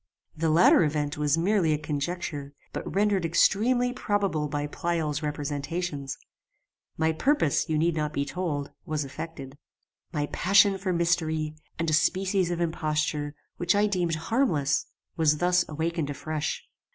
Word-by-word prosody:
The 165 0 0
latter 170 +2 +6
event 150 -1 -1
was 150 +1 +2
merely 175 -2 +2
a - - +1
conjecture, 145 -1 -4 0.2
but - - -4
rendered 200 -2 +2
extremely 245 +9 +3
probable 200 -10 0
by 145 0 -2
Pleyel's 155 -1 -2
representations. 145 0 -3 0.8
My 160 0 +2
purpose, 165 - +1
you 155 - +1
need 165 +2 +2
not 150 -1 -1
be 140 -2 -1
told, 150 -4 -3
was 150 -2 -2
effected. 140 -1 -8 0.5
"My 150 -3 -1
passion 195 +1 +4
for 185 0 -1
mystery, 165 -3 0 0.2
and 165 - -1
a 155 - +1
species 185 +3 +2
of 175 -1 -2
imposture, 155 -3 -1 0.2
which 175 +2 +2
I 205 +1 +4
deemed 180 -5 0
harmless, 160 - +1 0.3
was 155 -2 +3
thus 180 +1 +3
awakened 160 0 -2
afresh. 150 +1 -3
160 Hz, 140 wpm, -27 LUFS, 150-180 Hz, 0.8 s, latter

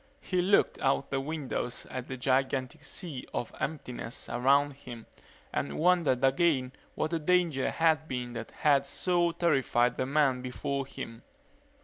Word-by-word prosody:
He 180 -1 0
looked 195 +3 +3
out 135 0 +1
the 135 - +1
windows 140 -4 -3
at 130 -1 -5
the 130 - -5
gigantic 130 +3 0
sea 150 -3 -5
of 120 - -3
emptiness 125 -6 -4
around 140 +4 +3
him 120 -4 -10 0.5
and - - -2
wondered 165 -7 +3
again 135 -1 +3 0.2
what 155 - -1
the 165 - 0
danger 165 -4 +2
had 160 -1 +2
been 125 -3 -4
that 115 -1 -6
had 140 -2 +2
so 175 +3 +1
terrified 135 -7 +2
the 130 - -1
men 135 -3 +2
before 135 +2 -3
him. 115 -3 -8
135 Hz, 145 wpm, -30 LUFS, 130-160 Hz, 0.5 s, looked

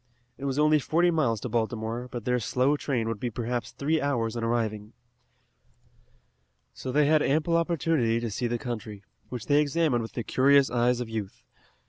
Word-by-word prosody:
It 140 - -7
was 135 0 -1
only 150 0 +4
forty 170 +5 +2
miles 135 -9 +1
to - - -3
Baltimore, 115 +1 -2
but 120 -3 -6
their 125 0 +1
slow 130 +5 +1
train 125 -6 -2
would 115 -2 -3
be 120 - -2
perhaps 120 0 -3
three 155 +6 -1
hours 120 -5 -1
in 115 - -3
arriving. 110 -2 -2 1.8
So 130 - -6
they 145 +3 +3
had 155 +1 +4
ample 155 +4 +1
opportunity 165 -8 +1
to 115 -2 -4
see 120 +4 -2
the 120 0 -1
country, 110 -4 -6 0.3
which 125 -3 -6
they 145 0 +4
examined 150 -4 +1
with 115 - -7
the 120 - -3
curious 140 +3 +4
eyes 120 0 +2
of 120 - -4
youth. 110 -4 -6
125 Hz, 180 wpm, -27 LUFS, 115-145 Hz, 1.8 s, only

